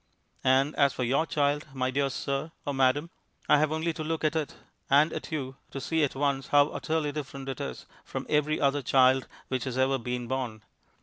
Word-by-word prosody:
And 135 Hz, +3 st, +3 dB
as 140 Hz, -2 st, +4 dB
for 125 Hz, -, -2 dB
your 135 Hz, +7 st, +1 dB
child, 145 Hz, 0 st, 0 dB
my 130 Hz, 0 st, 0 dB
dear 140 Hz, +1 st, +1 dB
sir 140 Hz, +4 st, -3 dB
(or 145 Hz, -, -1 dB
madam), 135 Hz, +5 st, +2 dB, 0.4 s
I 150 Hz, -, +6 dB
have 155 Hz, 0 st, +2 dB
only 160 Hz, +1 st, -1 dB
to 155 Hz, -, -5 dB
look 160 Hz, +1 st, -2 dB
at 155 Hz, +1 st, +1 dB
it 155 Hz, -3 st, -2 dB, 0.3 s
and 145 Hz, +3 st, +5 dB
at -, -, -6 dB
you 135 Hz, -4 st, -4 dB
to 135 Hz, -, -6 dB
see 160 Hz, +3 st, 0 dB
at 140 Hz, -, 0 dB
once 140 Hz, -1 st, 0 dB
how 145 Hz, 0 st, +5 dB
utterly 155 Hz, -2 st, -1 dB
different 140 Hz, -2 st, -6 dB
it 135 Hz, -, -4 dB
is -, -, -5 dB, 0.2 s
from -, -, -5 dB
every 150 Hz, 0 st, +1 dB
other 140 Hz, 0 st, +2 dB
child 130 Hz, 0 st, +4 dB, 0.2 s
which 130 Hz, -2 st, -1 dB
has 130 Hz, -1 st, -3 dB
ever 135 Hz, +1 st, +2 dB
been 125 Hz, +1 st, -3 dB
born. 125 Hz, -5 st, -3 dB
140 Hz, 205 wpm, -28 LUFS, 130-150 Hz, 0.4 s, I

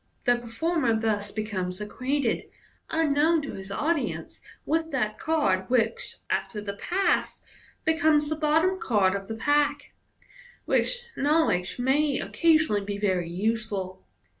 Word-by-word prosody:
The 245 Hz, -1 st, +5 dB
per 240 Hz, 0 st, -10 dB
former 245 Hz, -2 st, 0 dB
thus 210 Hz, -2 st, -1 dB
becomes 190 Hz, -4 st, -3 dB
ac 210 Hz, 0 st, -6 dB
quainted, 260 Hz, -1 st, -1 dB, 0.4 s
unknown 320 Hz, +1 st, +2 dB
to 280 Hz, -, -5 dB
his 190 Hz, 0 st, -7 dB
audience, 305 Hz, +8 st, -2 dB, 0.2 s
with 320 Hz, +1 st, 0 dB
that 245 Hz, -8 st, -2 dB
card 305 Hz, -, +1 dB
which, 255 Hz, -, 0 dB
after 210 Hz, -, -2 dB
the 205 Hz, -1 st, -5 dB
pass, 365 Hz, -, 0 dB, 0.4 s
be 320 Hz, -, +4 dB
comes 310 Hz, -2 st, +3 dB
the 310 Hz, -, -1 dB
bottom 320 Hz, +5 st, +2 dB
card 200 Hz, -5 st, +2 dB
of 195 Hz, -1 st, -4 dB
the 225 Hz, -, -4 dB
pack; 290 Hz, +3 st, +1 dB, 0.7 s
which 485 Hz, -1 st, +1 dB
know 305 Hz, +3 st, +3 dB
ledge 180 Hz, -, -1 dB
may 275 Hz, +3 st, +2 dB
occasionally 315 Hz, -11 st, +2 dB
be 200 Hz, 0 st, -4 dB
very 185 Hz, -4 st, 0 dB
useful. 200 Hz, -, -1 dB
255 Hz, 140 wpm, -26 LUFS, 205-315 Hz, 0.7 s, The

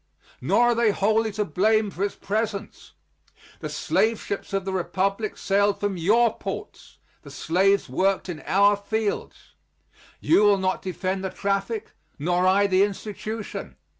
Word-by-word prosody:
Nor -, -, +2 dB
are -, -, +4 dB
they 235 Hz, -1 st, +3 dB
wholly 220 Hz, +2 st, +1 dB
to 210 Hz, +1 st, -1 dB
blame 210 Hz, +5 st, +1 dB
for 190 Hz, -, -4 dB
its 200 Hz, -, -2 dB
presence. 210 Hz, 0 st, -4 dB, 0.7 s
The -, -, -5 dB
slave 225 Hz, 0 st, 0 dB
ships 200 Hz, -, -5 dB
of 195 Hz, -1 st, -1 dB
the 190 Hz, -, -3 dB
Republic 195 Hz, +3 st, -1 dB
sailed 200 Hz, +1 st, +1 dB
from 205 Hz, -1 st, -1 dB
your 215 Hz, +7 st, +3 dB
ports, -, -, -7 dB, 0.2 s
the -, -, -13 dB
slaves 195 Hz, +4 st, +1 dB
worked 195 Hz, +1 st, 0 dB
in 170 Hz, -4 st, -6 dB
our 200 Hz, +2 st, +4 dB
fields. 210 Hz, +1 st, -4 dB, 0.7 s
You 320 Hz, -, +3 dB
will 205 Hz, -1 st, +5 dB
not 190 Hz, 0 st, -1 dB
defend 185 Hz, +1 st, -3 dB
the 190 Hz, -, -2 dB
traffic, 200 Hz, +3 st, -2 dB, 0.3 s
nor 175 Hz, +4 st, +1 dB
I 200 Hz, +2 st, +4 dB
the 190 Hz, -1 st, +3 dB
institution. 210 Hz, +2 st, -4 dB
200 Hz, 150 wpm, -24 LUFS, 190-215 Hz, 0.7 s, will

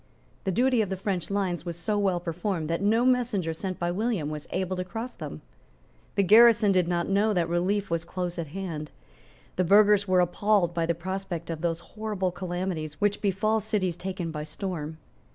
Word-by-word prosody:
The 190 Hz, -, +1 dB
duty 245 Hz, +4 st, +3 dB
of 205 Hz, -, -1 dB
the 190 Hz, -, -2 dB
French 190 Hz, -2 st, -2 dB
lines 195 Hz, -4 st, -1 dB
was 170 Hz, -1 st, -5 dB
so 210 Hz, +5 st, -1 dB
well 190 Hz, -3 st, +1 dB
performed 170 Hz, -1 st, -3 dB
that 165 Hz, -, -1 dB
no 225 Hz, +4 st, +3 dB
messenger 235 Hz, -10 st, +1 dB
sent 185 Hz, +3 st, -4 dB
by 175 Hz, 0 st, -1 dB
William 195 Hz, -6 st, -1 dB
was 150 Hz, -1 st, -6 dB
able 185 Hz, 0 st, -2 dB
to 180 Hz, -, -1 dB
cross 225 Hz, +6 st, -6 dB
them. 75 Hz, -, -8 dB, 0.7 s
The 200 Hz, -, +3 dB
garrison 220 Hz, +1 st, +7 dB
did 185 Hz, -3 st, +2 dB
not 170 Hz, -1 st, 0 dB
know 205 Hz, +2 st, +2 dB
that 175 Hz, -3 st, +1 dB
relief 185 Hz, +3 st, 0 dB
was 165 Hz, -1 st, 0 dB
close 175 Hz, 0 st, -4 dB
at 165 Hz, -, -3 dB
hand. 160 Hz, -2 st, -5 dB, 0.7 s
The 185 Hz, -, +3 dB
burghers 205 Hz, +2 st, +5 dB
were 185 Hz, -1 st, +4 dB
appalled 180 Hz, 0 st, +2 dB
by 165 Hz, -1 st, 0 dB
the 170 Hz, -, +1 dB
prospect 180 Hz, -1 st, -4 dB
of 160 Hz, -1 st, -5 dB
those 170 Hz, -1 st, -1 dB
horrible 210 Hz, -4 st, -2 dB
calamities 175 Hz, -4 st, -4 dB
which 205 Hz, 0 st, +1 dB
befall 215 Hz, +2 st, +1 dB
cities 205 Hz, -5 st, -1 dB
taken 180 Hz, -2 st, -4 dB
by 150 Hz, -1 st, -4 dB
storm. 160 Hz, -2 st, -5 dB
185 Hz, 190 wpm, -27 LUFS, 170-205 Hz, 0.7 s, garrison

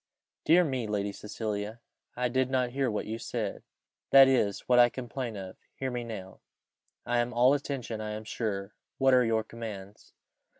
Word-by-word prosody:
"Dear 175 Hz, +3 st, +6 dB
me, 130 Hz, -7 st, -2 dB
Lady 100 Hz, -1 st, -1 dB
Cecilia! 105 Hz, +1 st, -5 dB, 0.4 s
I 125 Hz, 0 st, 0 dB
did 130 Hz, +1 st, +1 dB
not 130 Hz, -2 st, +1 dB
hear 135 Hz, 0 st, 0 dB
what 105 Hz, -, -2 dB
you 110 Hz, +1 st, -4 dB
said." 115 Hz, -3 st, -4 dB, 0.5 s
"That 135 Hz, -1 st, +9 dB
is 115 Hz, -7 st, +2 dB
what 125 Hz, -1 st, +3 dB
I 120 Hz, 0 st, +7 dB
complain 120 Hz, -2 st, -5 dB
of 95 Hz, -2 st, -8 dB, 0.2 s
hear 130 Hz, -1 st, -3 dB
me 120 Hz, -1 st, -3 dB
now." 100 Hz, -5 st, -8 dB, 0.7 s
"I 120 Hz, 0 st, +1 dB
am 120 Hz, 0 st, -1 dB
all 125 Hz, +3 st, +5 dB
attention, 135 Hz, -6 st, -3 dB
I 105 Hz, 0 st, -4 dB
am 110 Hz, +1 st, -6 dB
sure. 105 Hz, -3 st, -3 dB, 0.2 s
What 135 Hz, 0 st, +4 dB
are 125 Hz, -1 st, +6 dB
your 110 Hz, -1 st, +1 dB
commands?" 105 Hz, -3 st, -9 dB
120 Hz, 175 wpm, -29 LUFS, 105-130 Hz, 0.7 s, That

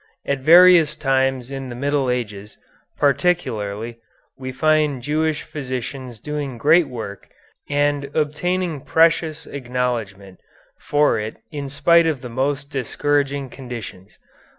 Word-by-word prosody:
At 140 Hz, -1 st, -1 dB
various 170 Hz, +2 st, +7 dB
times 135 Hz, -2 st, 0 dB
in 135 Hz, -1 st, -5 dB
the 120 Hz, -, -6 dB
early -, -, -9 dB
Middle 140 Hz, -2 st, +1 dB
Ages, 105 Hz, -4 st, -4 dB, 0.4 s
particularly, 120 Hz, -, 0 dB, 0.4 s
we 130 Hz, -1 st, -6 dB
find 150 Hz, -1 st, +1 dB
Jewish 155 Hz, +2 st, 0 dB
physicians 130 Hz, -4 st, -6 dB
doing 145 Hz, -1 st, -4 dB
great 155 Hz, +6 st, +4 dB
work 110 Hz, -6 st, -8 dB, 0.4 s
and 145 Hz, 0 st, +1 dB
obtaining 160 Hz, +1 st, -1 dB
precious 160 Hz, -1 st, +2 dB
acknowledgment 120 Hz, -8 st, -4 dB, 0.4 s
for 145 Hz, -5 st, +2 dB
it 110 Hz, +1 st, -5 dB
in 145 Hz, -3 st, -5 dB
spite 165 Hz, +4 st, +4 dB
of 150 Hz, -6 st, -1 dB
the 125 Hz, -, -7 dB
most 140 Hz, +3 st, -2 dB
discouraging 140 Hz, 0 st, -1 dB
conditions. 115 Hz, -7 st, -9 dB
140 Hz, 120 wpm, -21 LUFS, 125-150 Hz, 0.4 s, various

